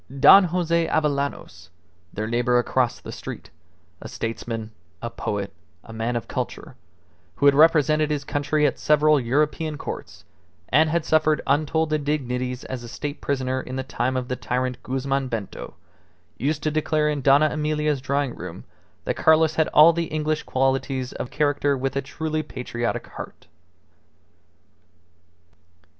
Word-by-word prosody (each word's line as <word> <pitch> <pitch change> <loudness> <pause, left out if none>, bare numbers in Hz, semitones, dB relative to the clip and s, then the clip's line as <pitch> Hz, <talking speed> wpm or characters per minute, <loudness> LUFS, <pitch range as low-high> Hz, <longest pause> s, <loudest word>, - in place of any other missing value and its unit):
Don 195 +7 +9
Jose 170 -1 0
Avellanos, 140 - -2 0.4
their 105 - -4
neighbour 120 +2 +1
across 120 0 +1
the - - -9
street, - - -8 0.5
a - - -7
statesman, 115 -1 -5 0.3
a 115 - -5
poet, 100 -3 -4 0.3
a 115 - -11
man 115 +2 -2
of 120 - -3
culture, - - -5 0.6
who 140 - 0
had 140 - +7
represented 155 0 +4
his 150 -2 -1
country 150 +1 0
at 140 - 0
several 150 0 +4
European 150 +5 0
Courts - - -8 0.4
(and 155 +1 +4
had 170 0 0
suffered 155 -1 +3
untold 155 +2 +1
indignities 130 -4 -2
as 130 -2 -6
a - - -8
state 145 +4 -6
prisoner 130 -2 -1
in 130 - -7
the 130 - -2
time 130 -1 -2
of 125 -1 -3
the 125 - -2
tyrant 125 0 -2
Guzman 135 +1 -2
Bento), 115 -5 -6 0.6
used 145 +3 -2
to 155 - 0
declare 155 0 +1
in 150 -2 -1
Dona 140 +3 +5
Emilia's 150 -2 -1
drawing 140 -1 -1
room - - -8 0.4
that - - -2
Carlos 160 0 +4
had 160 0 +2
all 160 +3 +7
the 170 0 -1
English 155 -1 -1
qualities 130 0 -1
of 125 - -5
character 145 -1 +1
with 135 0 -2
a 140 - +1
truly 155 +3 -3
patriotic 125 -5 -4
heart. - - -10
140 Hz, 150 wpm, -23 LUFS, 125-155 Hz, 0.6 s, Don